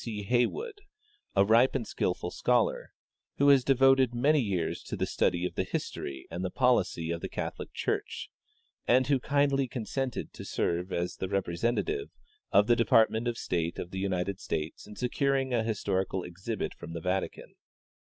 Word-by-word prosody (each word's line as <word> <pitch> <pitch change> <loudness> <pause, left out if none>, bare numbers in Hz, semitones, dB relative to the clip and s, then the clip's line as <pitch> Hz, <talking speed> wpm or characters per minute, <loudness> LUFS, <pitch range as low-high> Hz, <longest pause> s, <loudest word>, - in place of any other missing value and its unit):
C. 105 -3 -4
Heywood, 400 - 0 0.5
a 100 0 +5
ripe 115 +6 +4
and 125 -4 -1
skillful 90 -3 -2
scholar, 125 -2 +1 0.5
who 140 +1 +5
has 135 -2 +6
devoted 135 -1 +4
many 145 +5 +3
years 95 -7 -1
to - - -4
the - - 0
study 85 +1 +1
of - - -3
the - - 0
history 65 -1 -5
and 90 +2 -4
the 95 - -1
policy 100 -9 +1
of 85 0 -3
the - - -4
Catholic - - -5
church, - - -3 0.6
and 130 +2 +5
who 140 0 +2
kindly 140 0 +2
consented 125 +2 -3
to - - -8
serve 90 +2 -1
as 85 0 -2
the 95 - -3
representative 115 - -1 0.4
of 100 - +5
the 120 - +4
Department 115 0 +3
of 120 -1 -1
State 85 -1 -2
of 90 - -6
the 95 - -4
United 95 0 -1
States 80 -4 -4
in 105 - -10
securing 135 +1 0
a 120 - +3
historical 95 -4 -1
exhibit 95 +5 -4
from 80 - -9
the 85 - -5
Vatican. 90 +2 -3
110 Hz, 170 wpm, -29 LUFS, 90-130 Hz, 0.6 s, has